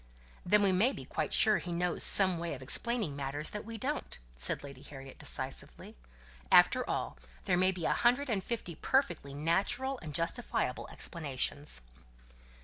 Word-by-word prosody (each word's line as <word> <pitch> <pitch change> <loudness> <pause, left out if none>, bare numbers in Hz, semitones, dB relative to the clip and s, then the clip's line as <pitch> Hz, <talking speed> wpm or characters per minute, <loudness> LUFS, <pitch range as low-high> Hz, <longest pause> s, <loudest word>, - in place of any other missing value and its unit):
"Then 205 +3 +3
we 195 - +3
may 215 +9 +2
be - - -9
quite - - -3
sure 215 -1 +3
he 180 - -7
knows 175 0 -1
some 185 -4 +7
way 170 -3 -4
of 130 - -10
explaining 215 - +1
matters 140 +2 -3
that 210 - -6
we 230 0 -7
don't," 285 +7 -4 0.2
said 60 - 0
Lady 140 -2 -11
Harriet, 135 -2 -11
decisively. - - -2 0.6
"After - - +5
all, - - -3 0.3
there - - +2
may 185 +1 +3
be 175 -3 -6
a - - +2
hundred 245 +4 +2
and 205 -6 -1
fifty 215 -6 -5
perfectly 170 - -1
natural 240 - -1
and 150 -3 -8
justifiable 170 - -2
explanations." 145 - -3
175 Hz, 160 wpm, -31 LUFS, 145-225 Hz, 0.6 s, some